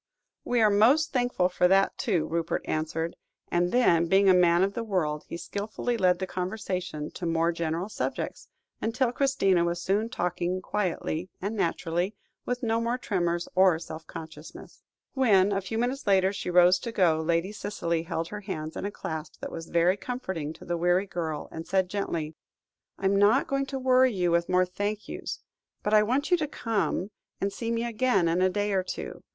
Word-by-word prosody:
"We 245 -1 +1
are 215 -1 +5
most 255 +10 +4
thankful 245 -8 +2
for 180 0 +2
that, 195 +1 +3
too," 180 -9 0
Rupert 165 +1 -2
answered; 160 +1 -2 0.3
and 175 +1 +1
then, 170 -9 +4
being 195 +3 +4
a 190 - +7
man 175 0 +4
of 195 +1 0
the 235 - -3
world, 160 -8 -1
he - - -5
skilfully 215 +6 -3
led 185 -5 +3
the 190 - -3
conversation 180 -5 -4
to 175 - -5
more 165 +1 +2
general 170 +2 -2
subjects, 215 - -4 0.3
until 240 +2 +1
Christina 245 -10 +2
was 170 0 -1
soon 205 +5 0
talking 180 -3 -2
quietly 180 -3 -2
and 205 +4 -3
naturally, 175 +1 -1 0.3
with 245 +1 -2
no 225 0 +1
more 235 +2 0
tremors 175 -7 -1
or 185 -3 +5
self 160 -1 -9
consciousness. 160 -1 -10 0.3
When, 205 -7 +4
a 195 0 0
few 195 +4 -4
minutes 245 +2 -2
later, 190 -1 +4
she 195 - -4
rose 180 +1 +5
to 235 - -5
go, 170 -7 +3
Lady 170 +4 0
Cicely 175 -6 -2
held 165 0 -3
her 210 0 -6
hands 160 -6 -5
in - - -4
a 205 - -2
clasp 160 -5 -6
that - - -6
was 165 0 -7
very 175 +3 +2
comforting 190 - -4
to - - -14
the 175 0 -1
weary 175 +3 +2
girl, 165 -5 -4
and 160 0 -7
said 190 -1 +1
gently 165 -6 -2 0.6
"I 195 - -5
am 195 +1 +3
not 210 +7 +4
going 275 0 -1
to 270 - -4
worry 260 0 +4
you 180 -4 0
with 170 0 +1
more 185 0 +4
thank 205 +3 -3
yous; - - -6 0.4
but 210 - 0
I 215 - +7
want 260 - 0
you 355 - +6
to 305 -2 -2
come 205 - -2 0.3
and 195 0 -1
see 230 +3 -4
me 230 0 0
again 235 -5 +2
in 170 +2 +1
a 185 - +4
day 205 +2 -1
or 190 - +2
two. 185 - -6
190 Hz, 195 wpm, -27 LUFS, 170-215 Hz, 0.6 s, a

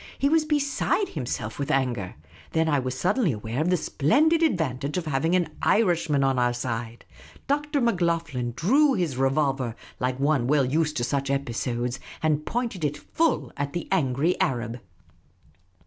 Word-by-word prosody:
He 280 - +2
was 315 0 +3
beside 300 +6 0
himself 120 -6 -4
with 140 +1 -2
anger. 125 -10 0 0.4
Then 160 0 +2
I 145 -3 +2
was 130 0 -3
suddenly 195 - +2
aware 110 +5 -3
of 165 - +1
the 180 - +3
splendid 300 - +2
ad 315 - +3
vantage 140 0 -2
of 180 - -2
having 155 +4 +1
an 175 -3 +1
Irishman 170 -9 +2
on 135 -1 +2
our 120 0 +2
side. 120 -1 -4 0.4
Dr. 295 +1 0
Macloghlen 165 - 0
drew 270 - +3
his 170 -9 -1
revolver, 135 -2 0 0.2
like 125 +1 -1
one 140 -3 +2
well 140 -1 +3
used 155 +3 0
to 120 - 0
such 140 +2 -1
episodes, 125 -2 -2 0.2
and 155 -1 +1
pointed 230 -8 -2
it 145 0 0
full 330 - 0
at 140 0 -3
the 175 - -4
angry 155 -1 +2
Arab. 120 -1 -1
145 Hz, 165 wpm, -25 LUFS, 125-180 Hz, 0.4 s, was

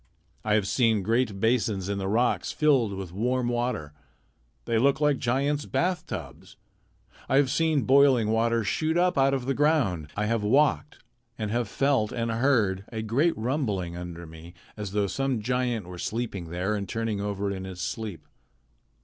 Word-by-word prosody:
I 105 -1 +2
have 105 -3 +1
seen 110 -3 +2
great 115 -1 0
basins 110 -4 +1
in 100 0 -2
the 95 - -2
rocks 120 +5 +1
filled 135 -9 +2
with 95 -3 -6
warm 125 +4 0
water. 120 -12 -2 0.7
They 115 -1 +1
looked 135 +3 +3
like 150 -3 +2
giants' 140 +4 0
bath 180 0 -1
tubs. - - -8 0.7
I - - +2
have 135 -1 +4
seen 155 -2 +2
boiling 130 -5 +4
water 115 +1 +2
shoot 160 +9 0
up 180 +1 +2
out 135 0 +3
of 130 -2 -3
the 135 - 0
ground. 135 - +1
I 105 - 0
have 115 0 0
walked, 140 +7 +1 0.3
and 105 -2 -3
have 120 0 0
felt 135 -4 +1
and 115 -1 -2
heard 115 -6 +2
a 110 -2 -4
great 135 +10 +1
rumbling 110 - -2
under 85 -1 -7
me 80 +2 -12 0.2
as 105 -2 -6
though 105 -1 +1
some 135 +4 -1
giant 120 -2 -1
were 90 0 -9
sleeping 105 -7 -4
there 90 +5 -1
and 100 -2 -3
turning 115 -3 -2
over 100 -1 -2
in 95 -1 -5
his 95 -2 -8
sleep. 105 0 -5
115 Hz, 175 wpm, -27 LUFS, 100-135 Hz, 0.7 s, have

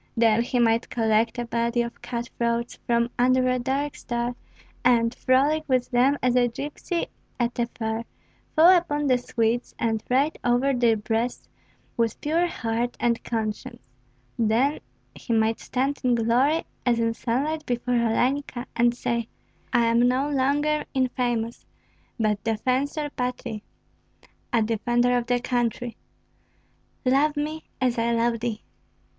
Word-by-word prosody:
Then 225 -1 +4
he 245 +2 -1
might 230 -1 +2
collect 225 0 +1
a 240 - -2
body 235 +1 0
of 235 0 -8
cut 235 -1 -4
throats 235 0 -1
from 235 0 +2
under 255 +1 +4
a 255 0 +1
dark 275 +4 -1
star 240 0 -3 0.5
and, 235 -1 +3
frolic 280 +6 +2
with 255 -1 +1
them 260 +4 +3
as 250 -1 +2
a 245 -1 +4
gypsy 290 +7 -4 0.3
at 240 0 -1
a 235 - +1
fair, 225 -1 -4 0.5
fall 345 +4 +8
upon 295 -4 0
the 255 -3 +3
Swedes, 235 0 -1
and 225 -1 -1
ride 275 +5 +2
over 245 +3 +2
their 235 -3 +3
breasts 225 +3 -2 0.5
with 230 -1 0
pure 330 +4 +1
heart 235 -5 -2
and 235 -1 +1
conscience; 220 -2 -3 0.6
then 235 +6 +2 0.3
he 235 - -4
might 220 0 +2
stand 270 +3 -1
in 250 -1 +3
glory 245 +8 +2 0.2
as 240 -2 +2
in 230 0 +1
sunlight 280 +8 -1
before 245 0 -1
Olenka, 245 +2 0
and 240 0 +3
say, 235 -1 -2 0.4
"I 235 - +3
am 230 +1 +4
no 260 +3 +1
longer 290 +3 +1
infamous, 245 -3 -1 0.6
but 210 -2 0
defensor 260 +6 -1
patriæ 250 -4 -4 0.9
(a 230 -3 +3
defender 240 +3 +1
of 240 -1 -1
the 245 -1 +2
country); 240 -1 -1 1.1
love 290 +4 +3
me, 310 +2 -3
as 250 -3 +1
I 230 +1 +1
love 230 0 +1
thee." 225 -2 -3
240 Hz, 145 wpm, -25 LUFS, 230-260 Hz, 1.1 s, fall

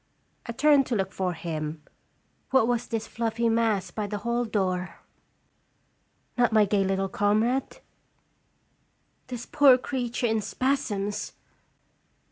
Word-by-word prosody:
I - - -3
turned 285 +2 +4
to 240 - -1
look 195 -2 -1
for 185 -2 -2
him. 155 -2 -5 0.7
What 265 -4 +4
was 245 -1 0
this 225 -1 -3
fluffy 230 0 -1
mass 220 -5 +1
by 210 +1 -3
the 205 +1 -4
hall 235 +3 -1
door? 185 -4 -1 1.4
Not 240 -1 +3
my 215 -1 +5
gay 200 0 +1
little 195 0 0
comrade? 215 +7 0 1.5
This 245 -2 -6
poor 280 -4 +6
creature 245 -2 -3
in 220 -1 +1
spasms 210 -5 -2
220 Hz, 120 wpm, -26 LUFS, 195-245 Hz, 1.5 s, poor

